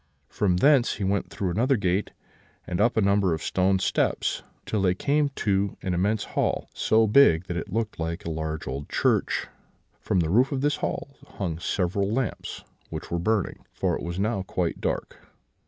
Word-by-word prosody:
From 95 -4 +1
thence 135 +2 +4
he 100 - -4
went 95 +1 0
through 95 -3 -2
another 125 +8 +2
gate, 95 0 0 0.6
and 90 -1 -2
up 120 -1 +2
a - - +5
number 100 -3 +3
of 80 - -7
stone 95 +1 +2
steps, - - 0 0.2
till 105 - -1
they 90 -1 +2
came 145 +7 +1
to 100 -1 0
an 95 -2 -1
immense 100 +4 +1
hall, - - -1
so 110 0 +3
big 105 -7 +5
that 90 - -5
it 90 +3 -4
looked 110 -1 -2
like 85 +5 -3
a 85 - -2
large 80 0 -3
old 70 +2 -5
church; - - +1 0.5
from 90 - +1
the 80 -1 -1
roof 125 +7 +4
of 135 -2 -1
this 145 +1 +1
hall - - -3 0.3
hung 85 -5 -2
several 95 +3 0
lamps, 125 +1 -3 0.3
which - - -7
were 85 - 0
burning, 105 +2 -1
for - - 0
it - - -5
was 85 +1 -4
now 105 +1 0
quite 90 -2 -2
dark. - - -3
100 Hz, 190 wpm, -26 LUFS, 90-110 Hz, 0.6 s, a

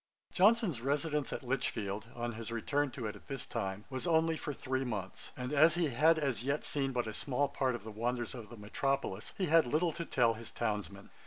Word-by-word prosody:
Johnson's 195 - +4
residence 145 +2 0
at - - -4
Lichfield, 110 -5 -2
on 120 0 -2
his 115 +1 -6
return 140 +5 0
to 125 -2 -6
it 105 0 -3
at 105 - -15
this 135 -2 -3
time, 95 +2 -3
was 130 +6 -2
only 165 -1 +3
for 155 - -4
three 130 -1 -2
months; 105 -7 -4
and 125 +2 -3
as 155 +3 +6
he 170 -3 +2
had 155 +6 +4
as 135 -7 0
yet 140 +3 0
seen 135 -2 -1
but 125 -2 0
a 110 - -4
small 140 +4 0
part 135 -2 0
of 120 - -7
the 110 - -7
wonders 120 +3 -2
of 115 -5 -8
the 120 - -10
Metropolis, 110 0 -2
he 190 - +1
had 165 -3 +5
little 160 +5 +2
to 170 - -4
tell 120 -7 +3
his 115 0 -8
townsmen. 105 -3 -3
130 Hz, 220 wpm, -33 LUFS, 115-150 Hz, -, as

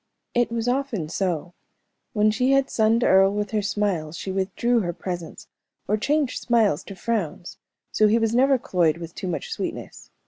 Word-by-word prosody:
It 240 -1 +1
was 230 0 -2
often 245 - -1
so. 175 -2 -2 0.6
When 215 0 +3
she 255 +4 +2
had 275 0 +2
sunned 225 +1 +2
Earle 195 -2 +5
with 205 -1 -3
her 215 - +1
smiles 190 -6 -1
she 190 - -5
withdrew 200 +5 0
her 175 -5 -2
presence, 175 -1 -6 0.4
or 210 - +2
changed 285 +4 0
smiles 220 - +2
to 195 - -9
frowns; 195 -6 -3 0.3
so 215 - +4
he 215 +2 +3
was 225 -1 +1
never 265 +2 +4
cloyed 170 -8 +1
with 170 -1 -8
too 185 - -6
much 470 - -4
sweetness. 445 - -6
210 Hz, 175 wpm, -24 LUFS, 180-235 Hz, 0.6 s, Earle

